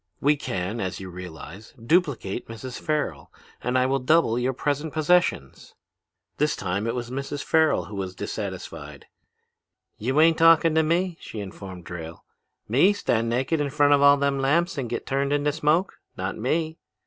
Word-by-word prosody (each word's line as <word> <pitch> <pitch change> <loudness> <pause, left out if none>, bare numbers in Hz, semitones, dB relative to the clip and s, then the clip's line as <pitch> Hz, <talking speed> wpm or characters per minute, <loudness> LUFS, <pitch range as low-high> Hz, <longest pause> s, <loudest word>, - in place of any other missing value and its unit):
We 145 +2 +3
can, 95 -4 -4
as 95 -3 -3
you 95 -1 -8
realize, 90 +3 -10
duplicate 125 - 0
Mrs. 115 +3 -7
Farrel, 145 - -2 0.3
and 125 +1 0
I 130 - +3
will 135 +1 +1
double 125 -3 +3
your 125 +2 +1
present 145 +3 -2
possessions.' 155 - 0 0.6
"This 150 0 +1
time 100 +3 -2
it 115 - -1
was 120 -1 -5
Mrs. 140 +2 -4
Farrel 160 - +2
who 100 +4 -9
was 95 -2 -4
dissatisfied. - - -6 0.9
'You 130 +7 0
ain't 165 +1 +5
talking 165 -1 +6
to 160 - +4
me,' 170 +2 0
she 110 - -8
informed 95 -3 -8
Drayle. 85 -1 -8 0.4
'Me 145 - +4
stand 115 - 0
naked 130 +6 0
in 145 - -1
front 145 0 +4
of 140 - +4
all 140 0 +7
them 140 -1 0
lamps 170 +7 +1
and 130 -5 -3
get - - -4
turned 140 +1 -1
into 145 0 +1
smoke? 160 +5 0 0.2
Not 95 +1 -3
me!' 160 +7 -1
135 Hz, 170 wpm, -25 LUFS, 105-155 Hz, 0.9 s, all